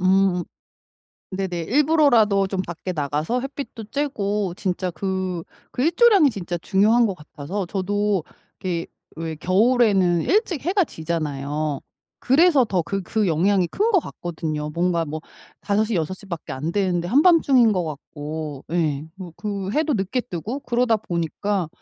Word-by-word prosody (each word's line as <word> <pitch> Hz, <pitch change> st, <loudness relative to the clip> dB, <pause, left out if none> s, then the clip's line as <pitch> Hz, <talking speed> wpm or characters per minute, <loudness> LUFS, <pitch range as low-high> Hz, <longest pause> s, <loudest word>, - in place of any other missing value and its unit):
으음. 185 Hz, -1 st, +3 dB, 0.9 s
네네. 185 Hz, -3 st, -3 dB
일부러라도 245 Hz, -, +4 dB
좀 190 Hz, -1 st, -2 dB
밖에 175 Hz, +1 st, -5 dB
나가서 150 Hz, -, -1 dB
햇빛도 270 Hz, -4 st, -6 dB
쬐고 210 Hz, -8 st, -2 dB
진짜 185 Hz, -1 st, -2 dB
그 185 Hz, 0 st, -3 dB, 0.3 s
그 250 Hz, -, -2 dB
일조량이 350 Hz, -, +5 dB
진짜 175 Hz, -4 st, -4 dB
중요한 210 Hz, +7 st, +3 dB
것 195 Hz, -, -2 dB
같아서 165 Hz, +4 st, -6 dB
저도 200 Hz, -1 st, 0 dB, 0.4 s
이렇게 175 Hz, -4 st, -2 dB, 0.3 s
왜 160 Hz, 0 st, -4 dB
겨울에는 195 Hz, -2 st, +3 dB
일찍 390 Hz, -, +1 dB
해가 370 Hz, +2 st, +2 dB
지잖아요. 150 Hz, -, -3 dB, 0.4 s
그래서 290 Hz, +1 st, +5 dB
더 190 Hz, -4 st, +1 dB
그 195 Hz, +3 st, -3 dB
그 215 Hz, +3 st, 0 dB
영향이 180 Hz, +3 st, +2 dB
큰 440 Hz, +3 st, +1 dB
것 380 Hz, -, +5 dB
같거든요. 155 Hz, -3 st, -4 dB
뭔가 170 Hz, 0 st, 0 dB
뭐 155 Hz, +1 st, -5 dB, 0.4 s
5:00 215 Hz, +2 st, 0 dB
6:00 185 Hz, +4 st, -3 dB
밖에 170 Hz, -7 st, -6 dB
안 150 Hz, +6 st, -3 dB
되는데 180 Hz, -3 st, 0 dB
한밤중인 275 Hz, -, +5 dB
것 180 Hz, -3 st, 0 dB
같고 150 Hz, -1 st, -6 dB
예 155 Hz, -4 st, 0 dB
뭐 180 Hz, -4 st, -9 dB
그 200 Hz, -2 st, -4 dB
해도 310 Hz, +3 st, +1 dB
늦게 205 Hz, +5 st, -1 dB
뜨고 230 Hz, -, -5 dB
그러다 240 Hz, -2 st, +2 dB
보니까, 180 Hz, -1 st, -2 dB
190 Hz, 280 characters per minute, -23 LUFS, 170-230 Hz, 0.9 s, 일조량이